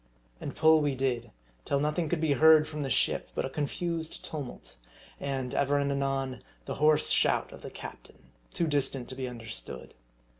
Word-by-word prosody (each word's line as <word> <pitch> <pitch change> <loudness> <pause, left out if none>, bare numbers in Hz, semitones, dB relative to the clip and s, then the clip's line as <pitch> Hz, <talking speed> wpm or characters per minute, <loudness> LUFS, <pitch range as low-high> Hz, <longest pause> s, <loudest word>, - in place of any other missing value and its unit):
And - - -6
pull 160 0 +6
we 145 -2 0
did, 125 -3 -1 0.3
till 140 - 0
nothing 150 +2 0
could 175 - 0
be 160 -2 +1
heard 155 +2 +7
from 150 -1 -5
the 135 - -2
ship 115 - +1
bu1> - - +1
a - - -3
confused 160 +3 -3
tumult; 140 - -7 0.4
and, 135 -3 -3
ever 140 +1 +2
and 140 0 +1
anon, 135 -2 -1 0.2
the - - -3
hoarse 150 0 +5
shout - - +3
of - - -11
the - - -7
captain, 65 - -11 0.2
too 170 - 0
distant 140 -4 -1
to 130 - -6
be 130 -1 -3
understood. 115 - -6
140 Hz, 180 wpm, -29 LUFS, 130-155 Hz, 0.4 s, heard